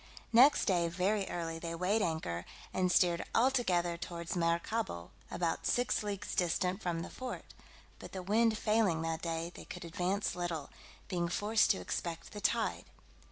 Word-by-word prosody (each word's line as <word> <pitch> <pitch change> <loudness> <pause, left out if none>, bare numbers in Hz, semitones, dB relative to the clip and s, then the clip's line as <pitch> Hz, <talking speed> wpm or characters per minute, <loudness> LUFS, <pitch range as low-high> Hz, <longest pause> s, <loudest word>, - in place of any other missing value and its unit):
Next 260 +6 +7
day, 175 -4 +2
very 190 +4 0
early, 165 -1 -3
they 170 0 -4
weighed 190 +6 +1
anchor, 160 - -1 0.3
and 185 -1 +2
steered 175 -2 +3
altogether 185 -9 +2
towards 170 0 -5
Maracaibo, 170 - -1 0.2
about 170 -2 -1
six 245 0 +2
leagues 205 -2 -4
distant 180 +1 +1
from 170 -2 -2
the - - -7
fort; 255 -1 -6 0.5
but - - -9
the 190 -1 -5
wind 220 +3 +3
failing 210 -7 +2
that 165 0 -2
day, 165 0 -2
they - - -10
could 180 -1 -8
advance 185 +3 -1
little, 170 -5 -3 0.4
being 175 -3 -1
forced 210 +5 +3
to 195 - +4
expect 170 -2 -4
the 205 - -7
tide. 230 +2 0
180 Hz, 160 wpm, -33 LUFS, 170-210 Hz, 0.5 s, Next